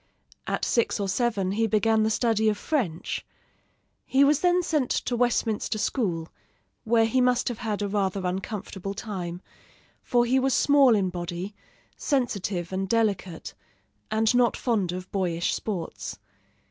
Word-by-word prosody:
At -, -, -1 dB
six 235 Hz, -2 st, +1 dB
or 200 Hz, -, -1 dB
seven 195 Hz, -2 st, 0 dB
he 225 Hz, +3 st, +1 dB
began 220 Hz, +1 st, +2 dB
the 215 Hz, -, +2 dB
study 220 Hz, -1 st, +2 dB
of 210 Hz, -, -1 dB
French. 215 Hz, -, -2 dB, 0.8 s
He 270 Hz, +1 st, +3 dB
was 290 Hz, +1 st, +4 dB
then 355 Hz, +1 st, +3 dB
sent 300 Hz, -6 st, 0 dB
to 245 Hz, -, -1 dB
Westminster 230 Hz, -2 st, 0 dB
school, 180 Hz, -8 st, -1 dB, 0.6 s
where 225 Hz, 0 st, +4 dB
he 255 Hz, +3 st, +2 dB
must 250 Hz, -1 st, +2 dB
have 240 Hz, -, -5 dB
had 215 Hz, -3 st, -2 dB
a -, -, 0 dB
rather 195 Hz, -2 st, -1 dB
uncomfortable 195 Hz, +1 st, -4 dB
time; 180 Hz, -4 st, -5 dB, 0.6 s
for 240 Hz, -1 st, +2 dB
he 255 Hz, +2 st, +3 dB
was 265 Hz, 0 st, +2 dB
small 280 Hz, -5 st, +5 dB
in 190 Hz, -3 st, +1 dB
body, 175 Hz, +3 st, -5 dB, 0.4 s
sensitive 200 Hz, -, -1 dB
and 190 Hz, 0 st, -2 dB
delicate, 200 Hz, -7 st, -1 dB, 0.6 s
and 220 Hz, +2 st, +2 dB
not 245 Hz, -1 st, +3 dB
fond 210 Hz, -8 st, 0 dB
of 185 Hz, +1 st, -7 dB
boyish 175 Hz, -3 st, 0 dB
sports. 160 Hz, -, -4 dB
215 Hz, 145 wpm, -26 LUFS, 190-240 Hz, 0.8 s, small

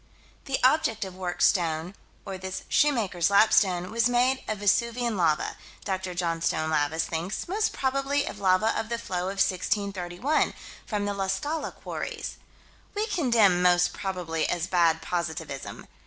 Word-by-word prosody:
This 270 Hz, -2 st, 0 dB
object 260 Hz, -6 st, +3 dB
of 185 Hz, -1 st, -9 dB
worked 180 Hz, -1 st, -2 dB
stone, 165 Hz, 0 st, +2 dB, 0.3 s
or 195 Hz, -, -5 dB
this 190 Hz, 0 st, -5 dB
shoemaker's 210 Hz, -, +2 dB
lapstone, 195 Hz, -3 st, +4 dB
was 230 Hz, +2 st, +2 dB
made 250 Hz, +2 st, +2 dB
of 215 Hz, -, -2 dB
Vesuvian 235 Hz, +3 st, +1 dB
lava, 165 Hz, -5 st, +1 dB, 0.3 s
Dr. 190 Hz, -2 st, -3 dB
Johnstone 165 Hz, -2 st, -1 dB
Lavis 155 Hz, +1 st, +1 dB
thinks: 170 Hz, +5 st, -4 dB
most 420 Hz, +4 st, 0 dB
probably 275 Hz, +2 st, 0 dB
of 205 Hz, -, -6 dB
lava 190 Hz, +3 st, +3 dB
of 220 Hz, -, -3 dB
the 235 Hz, -, -1 dB
flow 180 Hz, -6 st, -3 dB
of 195 Hz, -, -6 dB
1631, 195 Hz, -, -1 dB, 0.3 s
from 205 Hz, -2 st, -1 dB
the 205 Hz, -, -1 dB
La 195 Hz, -1 st, -2 dB
Scala 290 Hz, +10 st, -2 dB
quarries. -, -, -6 dB, 0.6 s
We 420 Hz, +1 st, 0 dB
condemn 235 Hz, -, +3 dB
"most 180 Hz, 0 st, +4 dB
probably" 175 Hz, -5 st, -2 dB
as 175 Hz, -1 st, 0 dB
bad 170 Hz, -3 st, +2 dB
positivism. 160 Hz, -5 st, -4 dB
190 Hz, 145 wpm, -27 LUFS, 175-235 Hz, 0.6 s, lapstone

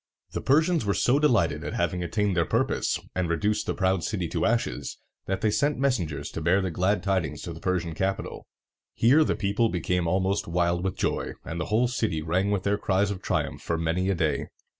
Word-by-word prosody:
The -, -, -3 dB
Persians 160 Hz, +4 st, +3 dB
were 100 Hz, -2 st, 0 dB
so 130 Hz, +4 st, +3 dB
delighted 135 Hz, -8 st, +2 dB
at -, -, -4 dB
having 85 Hz, +1 st, 0 dB
attained 100 Hz, +2 st, 0 dB
their 85 Hz, -, +3 dB
purpose, -, -, 0 dB
and 90 Hz, -1 st, -1 dB
reduced 105 Hz, +6 st, 0 dB
the -, -, -1 dB
proud 95 Hz, -3 st, +1 dB
city 95 Hz, -6 st, -2 dB
to 110 Hz, -, 0 dB
ashes, 115 Hz, +1 st, -1 dB, 0.3 s
that 95 Hz, 0 st, -2 dB
they 110 Hz, -2 st, +2 dB
sent 145 Hz, +7 st, +1 dB
messengers 115 Hz, -, -1 dB
to 80 Hz, -, -5 dB
bear 85 Hz, +5 st, +3 dB
the 95 Hz, -2 st, -2 dB
glad 95 Hz, +3 st, +1 dB
tidings 95 Hz, -7 st, -1 dB
to -, -, -5 dB
the -, -, -10 dB
Persian 90 Hz, -3 st, -1 dB
capital. 95 Hz, +4 st, -3 dB, 0.5 s
Here 135 Hz, +7 st, +5 dB
the -, -, 0 dB
people 105 Hz, +3 st, +1 dB
became 90 Hz, -1 st, -1 dB
almost 95 Hz, +3 st, 0 dB
wild 85 Hz, +1 st, +1 dB
with 95 Hz, -1 st, -2 dB
joy, -, -, -1 dB
and 85 Hz, +1 st, -4 dB
the -, -, -2 dB
whole 115 Hz, +4 st, +2 dB
city 110 Hz, -10 st, -1 dB
rang 90 Hz, +5 st, +1 dB
with 100 Hz, -3 st, 0 dB
their 100 Hz, 0 st, +1 dB
cries 100 Hz, +1 st, +1 dB
of 95 Hz, -2 st, -5 dB
triumph -, -, -2 dB
for 85 Hz, -, -2 dB
many 85 Hz, +3 st, 0 dB
a 95 Hz, -, +2 dB
day. 80 Hz, -4 st, 0 dB
95 Hz, 210 wpm, -26 LUFS, 85-105 Hz, 0.5 s, Here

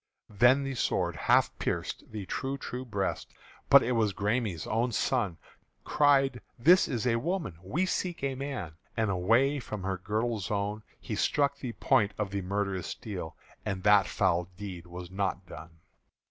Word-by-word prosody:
Then 125 Hz, +7 st, +5 dB
the 135 Hz, 0 st, -3 dB
sword 125 Hz, -, 0 dB
half -, -, +3 dB
pierced -, -, -3 dB
the 105 Hz, -3 st, -5 dB
true 135 Hz, +8 st, -3 dB
true 125 Hz, -1 st, -5 dB
breast: 100 Hz, -5 st, -3 dB, 0.4 s
But -, -, +8 dB
it 125 Hz, -, -1 dB
was 110 Hz, -5 st, +1 dB
the -, -, -15 dB
Græme's 105 Hz, -5 st, 0 dB
own 115 Hz, +3 st, 0 dB
son 105 Hz, -6 st, 0 dB, 0.5 s
Cried, 135 Hz, -3 st, +3 dB, 0.2 s
"This 175 Hz, +10 st, +6 dB
is 120 Hz, -2 st, -2 dB
a 115 Hz, -2 st, +3 dB
woman 155 Hz, -, -3 dB
we 155 Hz, -, -1 dB
seek 180 Hz, -4 st, -2 dB
a 135 Hz, -1 st, 0 dB
man!" 130 Hz, -, -4 dB, 0.3 s
And 110 Hz, -3 st, +1 dB
away 115 Hz, +10 st, +3 dB
from 105 Hz, -6 st, -6 dB
her 95 Hz, -1 st, -2 dB
girdle 110 Hz, +4 st, -1 dB
zone 105 Hz, +1 st, -2 dB, 0.2 s
He -, -, -6 dB
struck 140 Hz, -1 st, +1 dB
the 125 Hz, -3 st, -5 dB
point 110 Hz, -6 st, +2 dB
of 105 Hz, -2 st, -2 dB
the 100 Hz, 0 st, -2 dB
murderous 95 Hz, -1 st, -2 dB
steel; 90 Hz, -7 st, -6 dB, 0.3 s
And 95 Hz, -3 st, -3 dB
that 105 Hz, -1 st, +6 dB
foul 90 Hz, -3 st, +1 dB
deed 95 Hz, -4 st, -7 dB
was 90 Hz, 0 st, -8 dB
not 95 Hz, -1 st, -2 dB
done. 80 Hz, 0 st, -10 dB
105 Hz, 170 wpm, -29 LUFS, 95-130 Hz, 0.5 s, But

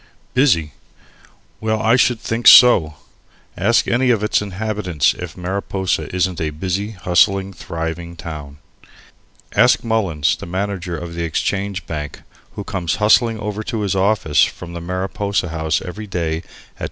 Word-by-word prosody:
Busy 115 Hz, -, +2 dB, 0.9 s
well, 110 Hz, 0 st, -1 dB
I 110 Hz, +2 st, +3 dB
should 120 Hz, -2 st, +2 dB
think 115 Hz, +1 st, -1 dB
so! 85 Hz, -11 st, +8 dB, 0.6 s
Ask -, -, +2 dB
any 125 Hz, +2 st, +2 dB
of 110 Hz, -4 st, +2 dB
its 105 Hz, -, +2 dB
inhabitants 100 Hz, -6 st, -1 dB
if 90 Hz, 0 st, -8 dB
Mariposa 95 Hz, 0 st, -2 dB
isn't 90 Hz, -1 st, 0 dB
a 80 Hz, -, 0 dB
busy, 95 Hz, +7 st, -3 dB
hustling, 95 Hz, +1 st, +2 dB
thriving 85 Hz, 0 st, -5 dB
town. 75 Hz, -4 st, -8 dB, 1.0 s
Ask -, -, +4 dB
Mullins, 95 Hz, -10 st, +1 dB
the -, -, -9 dB
manager 95 Hz, -1 st, -3 dB
of 85 Hz, +1 st, -7 dB
the 85 Hz, -, -4 dB
Exchange 95 Hz, +3 st, -2 dB
Bank, 75 Hz, -3 st, -6 dB, 0.3 s
who -, -, -5 dB
comes 85 Hz, -3 st, -2 dB
hustling 110 Hz, +1 st, +3 dB
over 105 Hz, 0 st, -4 dB
to 110 Hz, 0 st, -4 dB
his 100 Hz, -2 st, 0 dB
office 95 Hz, -5 st, +2 dB
from 85 Hz, -1 st, -4 dB
the 85 Hz, -, -6 dB
Mariposa 95 Hz, +1 st, -2 dB
House 80 Hz, -1 st, -1 dB
every 105 Hz, +4 st, -7 dB
day 85 Hz, -4 st, -2 dB
at 80 Hz, -, -9 dB
10. -, -, -23 dB
95 Hz, 150 wpm, -19 LUFS, 85-105 Hz, 1.0 s, so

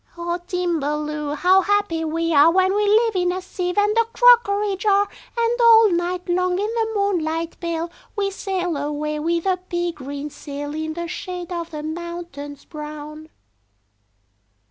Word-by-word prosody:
"O 345 Hz, +1 st, -2 dB
Timballoo! 300 Hz, -4 st, -2 dB
How 370 Hz, +5 st, +4 dB
happy 400 Hz, -4 st, 0 dB
we 330 Hz, +1 st, -1 dB
are 295 Hz, +3 st, +7 dB
When 375 Hz, +1 st, +3 dB
we 415 Hz, 0 st, +1 dB
live 440 Hz, +1 st, +3 dB
in 360 Hz, -1 st, +2 dB
a 365 Hz, -, -2 dB
sieve 360 Hz, 0 st, -4 dB
and 415 Hz, +1 st, +3 dB
a 460 Hz, -, +4 dB
crockery 455 Hz, -4 st, +4 dB
jar! 405 Hz, +1 st, +2 dB, 0.3 s
And 470 Hz, +1 st, +1 dB
all 450 Hz, -3 st, +7 dB
night 350 Hz, +1 st, -1 dB
long, 365 Hz, +1 st, +1 dB
in 405 Hz, -, 0 dB
the 450 Hz, 0 st, -1 dB
moonlight 335 Hz, -5 st, -1 dB
pale, 335 Hz, -1 st, -3 dB, 0.2 s
We 400 Hz, -2 st, 0 dB
sail 365 Hz, -4 st, -2 dB
away 300 Hz, +1 st, -3 dB
with 335 Hz, +2 st, -1 dB
a 375 Hz, -1 st, +2 dB
pea 350 Hz, -1 st, -3 dB
green 285 Hz, -1 st, -7 dB
sail 290 Hz, 0 st, -6 dB
In 315 Hz, 0 st, -4 dB
the 340 Hz, 0 st, -4 dB
shade 360 Hz, +1 st, -6 dB
of 340 Hz, -1 st, -4 dB
the 305 Hz, -3 st, -6 dB
mountains 315 Hz, -3 st, -7 dB
brown." 305 Hz, 0 st, -8 dB
345 Hz, 160 wpm, -22 LUFS, 310-395 Hz, 0.3 s, are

